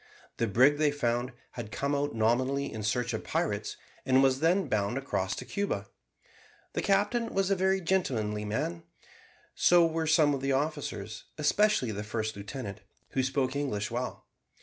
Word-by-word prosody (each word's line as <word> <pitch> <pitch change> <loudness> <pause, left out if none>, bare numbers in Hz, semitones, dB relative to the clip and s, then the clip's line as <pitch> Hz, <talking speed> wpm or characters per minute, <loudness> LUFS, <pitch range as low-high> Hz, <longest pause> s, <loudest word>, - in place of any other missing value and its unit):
The 115 - +1
brig, 130 +8 +4
they 155 -1 +4
found, 120 -3 -1 0.2
had 115 -3 -7
come 140 +4 -1
out 145 -2 -1
nominally 130 +5 +1
in 110 - -5
search 120 +4 0
of - - -3
pirates, - - -2 0.3
and 130 +1 +4
was 135 -1 +3
then 170 +3 +2
bound 105 0 0
across 100 -9 -1
to - - -7
Cuba. 200 0 -2 0.8
The - - -1
captain 205 +4 +2
was 195 0 +1
a - - +4
very 190 +1 +2
gentlemanly 115 - 0
man; 105 -5 -2 0.7
so 175 -1 +5
were 165 0 -1
some 155 -2 +4
of 135 - -2
the 135 0 +1
officers, 135 -8 -3
especially 155 - +2
the 105 0 -4
first 110 0 -3
lieutenant, 100 0 -6 0.3
who 135 - 0
spoke 130 0 0
English 105 -8 -2
well. 125 +2 -4
135 Hz, 165 wpm, -29 LUFS, 110-155 Hz, 0.8 s, so